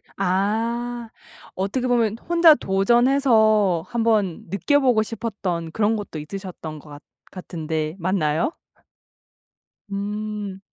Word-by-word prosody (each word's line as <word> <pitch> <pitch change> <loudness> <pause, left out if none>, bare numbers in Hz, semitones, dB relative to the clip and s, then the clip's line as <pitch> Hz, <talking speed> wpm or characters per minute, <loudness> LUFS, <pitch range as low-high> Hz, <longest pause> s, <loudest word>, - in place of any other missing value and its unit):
아. 225 +5 -1 0.5
어떻게 200 +7 -1
보면 230 -3 +1
혼자 335 -2 +7
도전해서 215 - +3
한번 220 -8 0
느껴 200 - +2
보고 250 -5 +3
싶었던 200 -7 -4
그런 220 +4 +1
것도 200 -7 -6
있으셨던 165 -2 -7
것 150 - -17
같 145 0 -11 0.3
같은데 160 -3 -4
맞나요? 170 - 0 1.4
음. 205 -1 -4
205 Hz, 215 characters per minute, -23 LUFS, 180-230 Hz, 1.4 s, 혼자